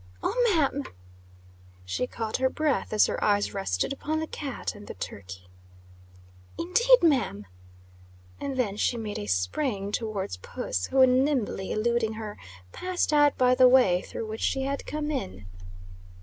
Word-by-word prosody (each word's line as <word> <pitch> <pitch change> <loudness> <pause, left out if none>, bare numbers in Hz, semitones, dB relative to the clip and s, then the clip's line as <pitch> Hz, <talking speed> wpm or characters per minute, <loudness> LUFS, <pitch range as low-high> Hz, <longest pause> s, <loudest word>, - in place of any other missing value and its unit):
"Oh, - - 0 0.2
ma'am!" 285 -2 +1 1.0
She 95 - -2
caught 225 -3 -3
her 260 0 +2
breath 305 0 -1
as 215 - +5
her - - -2
eyes 205 -1 +2
rested 195 - -1
upon 310 +3 -2
the 315 - -2
cat 285 -4 -5
and 205 -1 -12
the - - -7
turkey. 90 -1 -8 1.1
"Indeed, 470 +5 +4
ma'am!" 250 - +2 0.9
And 275 -2 -4
then 210 -6 0
she 240 - +1
made 215 -2 -4
a 105 - -6
spring 195 - -1
towards 205 - -3
puss, 90 0 -4
who, 265 -1 +5
nimbly 255 -6 +1
eluding 225 0 0
her, 215 -1 -7 0.3
passed 365 -4 -1
out 290 -1 +4
by 250 0 +4
the 255 0 +6
way 220 -9 +5
through 225 - -6
which 220 +1 -6
she 270 - 0
had 275 +1 -3
come 300 0 -3
in. 95 - -4
240 Hz, 150 wpm, -27 LUFS, 200-280 Hz, 1.1 s, the